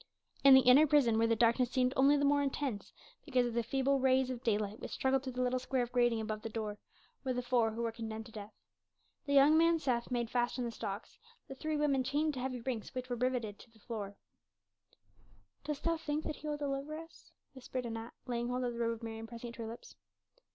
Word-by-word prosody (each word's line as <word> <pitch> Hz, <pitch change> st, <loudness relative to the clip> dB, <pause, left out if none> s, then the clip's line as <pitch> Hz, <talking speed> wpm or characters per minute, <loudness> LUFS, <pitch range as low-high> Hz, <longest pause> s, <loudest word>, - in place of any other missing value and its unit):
In 275 Hz, -1 st, +9 dB
the 265 Hz, -, +8 dB
inner 265 Hz, +5 st, +7 dB
prison, 255 Hz, -7 st, +4 dB
where 230 Hz, -, +3 dB
the 230 Hz, -, +3 dB
darkness 235 Hz, +2 st, +3 dB
seemed 255 Hz, 0 st, +1 dB
only 280 Hz, +2 st, +5 dB
the 285 Hz, -, +2 dB
more 285 Hz, 0 st, +4 dB
intense 275 Hz, -5 st, -3 dB, 0.3 s
because 255 Hz, -5 st, +1 dB
of 240 Hz, -, -3 dB
the 235 Hz, -, +1 dB
feeble 270 Hz, +3 st, +1 dB
rays 260 Hz, 0 st, +3 dB
of 245 Hz, -2 st, -5 dB
daylight 210 Hz, -1 st, 0 dB
which -, -, -6 dB
struggled 265 Hz, 0 st, +1 dB
through 260 Hz, -1 st, -6 dB
the 250 Hz, +1 st, -1 dB
little 250 Hz, 0 st, +1 dB
square 255 Hz, 0 st, 0 dB
of 240 Hz, -, -6 dB
grating 240 Hz, -2 st, +2 dB
above 215 Hz, -1 st, -4 dB
the 225 Hz, -, -5 dB
door, 215 Hz, -2 st, -4 dB, 0.4 s
were 260 Hz, -2 st, -1 dB
the 250 Hz, 0 st, -2 dB
four 240 Hz, -2 st, +2 dB
who 225 Hz, +2 st, -4 dB
were 230 Hz, -, -1 dB
condemned 220 Hz, -1 st, -6 dB
to 230 Hz, -, -13 dB
death. 210 Hz, -1 st, -8 dB, 0.8 s
The 280 Hz, -, 0 dB
young 280 Hz, +3 st, +7 dB
man 335 Hz, 0 st, +4 dB
Seth 245 Hz, -6 st, -1 dB
made 240 Hz, -2 st, -2 dB
fast 240 Hz, 0 st, 0 dB
in 250 Hz, -, -1 dB
the 235 Hz, -, -3 dB
stocks, 200 Hz, -2 st, -6 dB, 0.3 s
the -, -, -7 dB
three 305 Hz, +3 st, -3 dB
women 280 Hz, -3 st, +2 dB
chained 295 Hz, +4 st, 0 dB
to 260 Hz, -, -5 dB
heavy 255 Hz, -1 st, -3 dB
rings 240 Hz, -1 st, -4 dB
which 255 Hz, 0 st, -5 dB
were -, -, +1 dB
riveted 250 Hz, -1 st, 0 dB
into -, -, -16 dB
the 225 Hz, -, -23 dB
stone 215 Hz, -, -25 dB
floor. 205 Hz, -4 st, -5 dB, 1.5 s
"Dost 295 Hz, -1 st, -4 dB, 0.2 s
think 295 Hz, +1 st, -1 dB
that 305 Hz, -, -4 dB
He 305 Hz, -, -8 dB
will 295 Hz, -1 st, -2 dB
deliver 285 Hz, +1 st, -3 dB
us?" 325 Hz, +1 st, -13 dB, 0.2 s
whispered 255 Hz, -1 st, -5 dB
Anat, 225 Hz, 0 st, -6 dB
laying 240 Hz, -1 st, -2 dB
hold 250 Hz, +1 st, -1 dB
of 245 Hz, -1 st, -1 dB
the 235 Hz, -, -7 dB
robe 230 Hz, 0 st, +1 dB
of 230 Hz, 0 st, -10 dB
Mary 225 Hz, -1 st, -5 dB
and 225 Hz, -, -7 dB
pressing 235 Hz, +1 st, -8 dB
it -, -, -10 dB
to -, -, -6 dB
her 225 Hz, -, -4 dB
lips. 230 Hz, -, -11 dB
250 Hz, 240 wpm, -33 LUFS, 230-270 Hz, 1.5 s, In